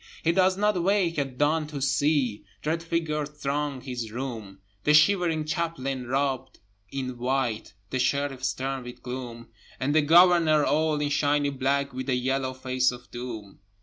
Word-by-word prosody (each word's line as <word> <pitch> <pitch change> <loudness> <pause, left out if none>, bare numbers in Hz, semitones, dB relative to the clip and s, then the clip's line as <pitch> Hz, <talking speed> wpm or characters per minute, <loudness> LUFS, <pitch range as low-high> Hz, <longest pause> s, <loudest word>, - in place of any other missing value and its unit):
He 165 - +3
does 185 +1 +3
not 210 -3 +2
wake 180 -3 +1
at 135 -3 -3
dawn 150 +2 +2
to 150 -2 -6
see 135 -4 +1 0.2
Dread 160 +2 -1
figures 160 -3 -2
throng 145 -2 -3
his 120 -4 -5
room, 115 -6 -6 0.3
The 150 - +5
shivering 165 -1 +4
Chaplain 135 -6 -2
robed 135 0 -1 0.3
in 130 -2 -4
white, 120 -5 -1 0.2
The 130 - -1
Sheriff 135 0 0
stern 135 0 -2
with 125 0 -10
gloom, 120 -2 -7 0.3
And 135 +2 0
the 155 - +5
Governor 165 -1 +5
all 155 0 +1
in 145 0 0
shiny 145 0 +1
black, 140 +1 0
With 130 +1 -5
the 130 - +2
yellow 130 +1 -1
face 130 0 +1
of 125 0 -12
Doom. 115 -5 -7
140 Hz, 160 wpm, -26 LUFS, 130-155 Hz, 0.3 s, The